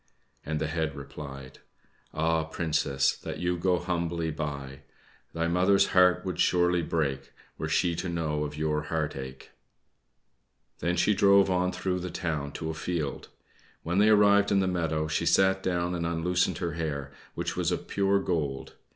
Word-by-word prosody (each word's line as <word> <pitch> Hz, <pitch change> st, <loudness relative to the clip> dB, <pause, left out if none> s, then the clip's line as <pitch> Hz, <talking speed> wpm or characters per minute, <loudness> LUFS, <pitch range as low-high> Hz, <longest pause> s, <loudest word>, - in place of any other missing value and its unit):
and 75 Hz, 0 st, -2 dB
the 80 Hz, -, -1 dB
head 80 Hz, -2 st, -2 dB
replied: 70 Hz, -1 st, -9 dB, 0.5 s
"Ah 80 Hz, +1 st, +1 dB
Princess, 75 Hz, -4 st, 0 dB
that -, -, -7 dB
you 90 Hz, 0 st, 0 dB
go 90 Hz, +1 st, +1 dB
humbly 85 Hz, -2 st, -2 dB
by! 70 Hz, -3 st, -5 dB, 0.5 s
Thy 85 Hz, 0 st, -1 dB
mother's 90 Hz, +3 st, +3 dB
heart 90 Hz, 0 st, +4 dB
would 90 Hz, -, -4 dB
surely 90 Hz, -1 st, +3 dB
break 70 Hz, -5 st, -2 dB, 0.3 s
Were -, -, -3 dB
she 85 Hz, -, +2 dB
to 90 Hz, -, -3 dB
know 80 Hz, -3 st, -1 dB
of 75 Hz, 0 st, -5 dB
your 75 Hz, 0 st, 0 dB
heart 75 Hz, -1 st, -2 dB
ache!" 65 Hz, -1 st, -8 dB, 1.3 s
Then 85 Hz, +2 st, 0 dB
she 105 Hz, +4 st, +3 dB
drove 100 Hz, -1 st, +5 dB
on 90 Hz, 0 st, +1 dB
through 90 Hz, -1 st, -2 dB
the 90 Hz, 0 st, -5 dB
town 80 Hz, -6 st, -3 dB
to 80 Hz, 0 st, -4 dB
a -, -, -5 dB
field. 80 Hz, -3 st, -3 dB, 0.6 s
When 90 Hz, +4 st, 0 dB
they 105 Hz, +1 st, +5 dB
arrived 100 Hz, -1 st, +5 dB
in 100 Hz, -, +4 dB
the 95 Hz, -, +2 dB
meadow, 80 Hz, -4 st, -1 dB
she 75 Hz, -, -1 dB
sat 95 Hz, 0 st, +4 dB
down 90 Hz, -1 st, -1 dB
and 85 Hz, -1 st, -2 dB
unloosened 85 Hz, +2 st, 0 dB
her 85 Hz, -1 st, -2 dB
hair, 75 Hz, -4 st, -4 dB, 0.2 s
which -, -, -3 dB
was -, -, 0 dB
of -, -, -3 dB
pure 100 Hz, 0 st, +2 dB
gold. 75 Hz, -8 st, -2 dB
85 Hz, 170 wpm, -28 LUFS, 75-90 Hz, 1.3 s, drove